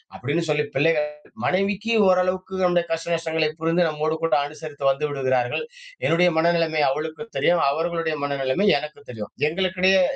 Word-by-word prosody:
அப்படீன்னு 145 +6 -1
சொல்லி 150 0 +1
பிள்ளைகள், 150 +1 +2 0.4
மனைவிக்கி 200 +4 0 0.2
ஓரளவுக்கு 185 +1 0
நம்முடைய 175 -1 +2
கஷ்ட 165 +1 -1
நஷ்டங்களை 160 -1 0
புரிந்து 165 +1 +2
நம்மோடு 155 +1 -1
கூட 165 - +2
அனுசரித்து 145 -2 -3
வந்து 150 +2 -2
விடுகிறார்கள். 130 - 0 0.4
என்னுடைய 175 +2 +4
மனநிலமை 165 -2 +2
அவளுக்கு 155 +8 -4
தெரியும் 175 -3 +3
அவர்களுடைய 165 0 -1
மனநிலமை 140 +7 0
எனக்கும் 150 -2 -10
தெரியும். 105 -3 -8 0.2
எங்களுக்கிடையே 185 +2 +2
160 Hz, 135 wpm, -23 LUFS, 150-180 Hz, 0.4 s, என்னுடைய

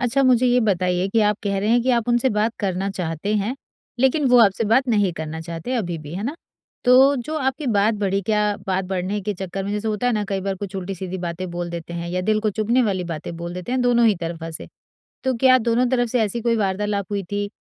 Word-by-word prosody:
अच्छा 255 +2 +1
मुझे 255 -1 +4
ये 250 0 +4
बताइए 185 -3 +1
कि 225 +3 +2
आप 210 -1 +2
कह 200 -1 0
रहे 205 +2 -1
हैं 240 +1 +4
कि 260 - +1
आप 235 -2 +1
उनसे 240 +2 +3
बात 215 +2 +1
करना 195 -1 -1
चाहते 180 +2 -3
हैं, 210 +5 -1 0.5
लेकिन 265 +3 +3
वो 250 0 +6
आपसे 200 +2 +1
बात 260 +2 +3
नहीं 205 -5 +2
करना 160 -1 -6
चाहते 165 +9 -5
अभी 175 -8 -2
भी, 150 +1 -9
है 190 - -4
ना। 285 +7 -3 0.5
तो 265 +3 +6
जो 290 +5 -4
आपकी 270 +1 -2
बात 205 +2 +3
बढ़ी, 195 -1 +1
क्या 210 0 +1
बात 190 0 0
बढ़ने 190 +2 -2
के 210 +1 -2
चक्कर 190 +1 -5
में 200 - -3
जैसे 210 +1 -2
होता 215 +2 -1
है 245 - +2
ना 210 -2 0
कई 195 -1 -1
बार 195 0 -2
कुछ 195 0 -7
उल्टी-सीधी 190 0 -5
बातें 175 +1 -4
बोल 175 0 -4
देते 170 0 -6
हैं 170 - -5
या 180 +1 -1
दिल 215 +2 +1
को 215 0 0
चुभने 235 +4 +3
वाली 190 -5 -1
बातें 165 0 -6
बोल 170 +1 -6
देते 180 +6 -5
हैं, 255 - +1
दोनों 240 -1 +4
ही 215 - +4
तरफा 165 -1 -5
से। - - -10 0.6
तो 260 -1 +1
क्या 255 0 +8
दोनों 240 +2 +3
तरफ 245 -2 +1
से 250 - +1
ऐसी 220 +2 -1
कोई 235 0 +2
वार्तालाप 200 -1 -1
हुई 200 -1 -1
थी? 205 0 -1
205 Hz, 250 wpm, -22 LUFS, 185-240 Hz, 0.6 s, क्या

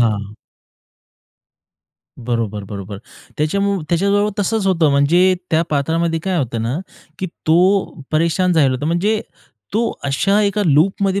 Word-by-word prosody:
हां. 105 -3 0 1.8
बरोबर, 115 -4 -3
बरोबर. 100 0 -7 0.4
त्याच्यामुळ 200 +4 0
त्याच्याजवळ 200 +4 +2
तसंच 205 0 0
होतं. 165 -5 +3
म्हणजे 170 +7 +4 0.2
त्या 160 +1 +3
पात्रामध्ये 165 +3 0
काय 185 +1 -2
होतं 120 -4 -2
ना, 120 +5 -2 0.4
की 185 - -2 0.2
तो 185 +2 +2
परेशान 170 +3 +2
झालला 145 -5 +3
होता. 145 +4 -3
म्हणजे 205 +6 +1 0.5
तो 230 +1 +1
अशा 195 +10 +2
एका 205 +1 +1
लूपमध्ये 190 +6 +2
165 Hz, 125 wpm, -18 LUFS, 135-195 Hz, 1.8 s, म्हणजे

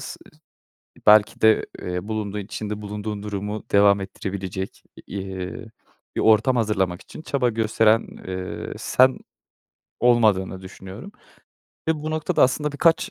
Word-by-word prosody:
s - - -7
se - - -12 0.9
belki 110 +3 +5
de, 110 0 +5 0.2
eee, 90 +3 -4
bulunduğun, 105 -2 -3
içinde 105 +1 -5
bulunduğun 105 0 -5
durumu 105 +1 -4
devam 100 0 +5
ettirebilecek, 95 -1 -5 0.2
eee, 95 +3 -5 0.5
bir - - 0
ortam 110 +4 +4
hazırlamak 95 -6 0
için 155 - -11
çaba 135 -5 0
gösteren, 110 0 +2 0.2
eee, 95 0 -5
sen 130 +1 +3 0.8
olmadığını 105 -6 +3
düşünüyorum 95 - -10 0.8
ve 160 - +4
bu 155 - -3
noktada 155 -1 +1
aslında 150 +3 +2
birkaç, 165 +6 +2
105 Hz, 125 wpm, -23 LUFS, 95-115 Hz, 0.9 s, belki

